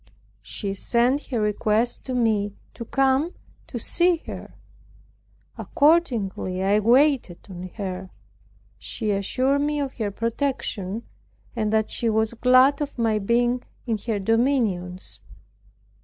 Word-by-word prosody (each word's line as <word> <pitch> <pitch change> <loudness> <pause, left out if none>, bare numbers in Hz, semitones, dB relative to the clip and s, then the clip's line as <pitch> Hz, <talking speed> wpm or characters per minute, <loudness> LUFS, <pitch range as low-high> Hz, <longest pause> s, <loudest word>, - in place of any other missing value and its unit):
She 200 -2 -3
sent 240 +7 +1
her 245 -5 -2
request 215 +2 0
to 255 - -3
me 210 -4 +1 0.2
to 235 - -7
come 270 +6 +1 0.3
to 245 - -6
see 345 +9 +3
her. - - -8 1.0
Accordingly 235 - +1
I 200 +2 +3
waited 245 - +2
on 185 0 -7
her. 190 -3 -5 0.7
She 215 -3 -3
assured 255 +8 +1
me 295 0 0
of 275 -2 -4
her 215 -4 -1
protection, 230 -2 -3 0.5
and 215 -2 -1
that 220 -1 +1
she 235 - 0
was 220 +1 +1
glad 255 +4 +4
of 290 -2 -4
my 225 -2 +1
being 240 +4 +1 0.2
in 225 -4 -1
her 220 -3 0
dominions. 195 - 0
230 Hz, 125 wpm, -24 LUFS, 205-260 Hz, 1.0 s, glad